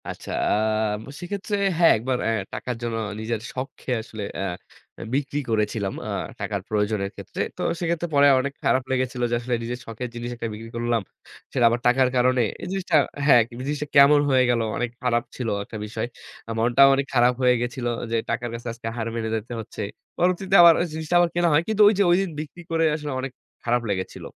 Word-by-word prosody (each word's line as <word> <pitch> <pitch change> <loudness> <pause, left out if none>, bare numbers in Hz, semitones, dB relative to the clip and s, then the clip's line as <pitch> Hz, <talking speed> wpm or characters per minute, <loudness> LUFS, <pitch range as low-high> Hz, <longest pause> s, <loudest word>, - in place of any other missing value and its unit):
আচ্ছা, - - -7 0.2
আ - - +4 0.7
সেক্ষেত্রে 200 +3 -3 0.2
হ্যাঁ, 170 -1 +6
১ - - -7
বার 125 -1 +1
অ্যা 115 - +2 0.2
টাকার 125 - -4
জন্য 115 -1 -2 0.2
নিজের 110 +1 -2
শখ 130 +1 -3
কে - - -5
আসলে 110 -2 -8
অ্যা 95 - -2 0.5
এ - - -7
বিক্রি 145 +1 -1
করেছিলাম। 105 -2 0
আ - - -4 0.3
টাকার - - -3
প্রয়োজনের 105 -2 0
ক্ষেত্রে। - - -6 0.2
তো - - -5 0.2
সেক্ষেত্রে 170 0 -1
পরে 140 0 +6
অনেক 140 +2 -2
খারাপ 130 - +2
লেগেছিল 130 -1 -1
যে, - - +2
"আসলে 120 +1 -1
নিজের 120 +1 -4
শখের 115 +2 -6
জিনিস 120 0 -4
একটা 115 -1 -4
বিক্রি 115 +2 -9
করলাম? 120 -1 0 0.5
সেটা 125 -3 +3
আবার 120 +1 0
টাকার 125 +1 +4
কারণে।" 125 0 +3 0.2
এই - - -5
জিনিসটা 190 -3 -1 0.3
হ্যাঁ, 130 -5 +7 0.3
"জিনিসটা 150 0 -2
কেমন 140 +1 +8
হয়ে 130 -1 +4
গেল?" 120 -1 +2 0.2
অনেক 125 0 -1
খারাপ 120 -1 +2
ছিল 125 - -4 0.2
একটা 110 - -8
বিষয়। 110 +2 -4 0.5
মনটাও 120 +4 +6
অনেক 140 0 0
খারাপ 125 0 +4
হয়ে 125 -1 +5
গেছিল 120 +1 -3 0.3
যে, - - +1
"টাকার 120 +1 -2
কাছে 115 +1 -7
আজকে 115 -1 -8
হার 115 -1 -2
মেনে 110 -1 -2
যেতে 110 +2 -5
হচ্ছে।" 110 - -7 0.4
পরবর্তীতে 185 +2 +1
আবার 170 -1 +9 0.2
জিনিসটা 160 +2 -2
আবার 175 -1 +4
কেনা 175 0 +3
হয়। 150 - +5
কিন্তু 215 -1 +1
ঐযে 205 -1 +4
ঐদিন 190 +2 +2
বিক্রি 155 +3 -7
করে 165 0 +2
আসলে 150 -1 -5
অনেক 130 0 -4 0.3
খারাপ 120 +1 +1
লেগেছিল। 95 -1 -4
125 Hz, 195 wpm, -24 LUFS, 115-150 Hz, 0.7 s, আবার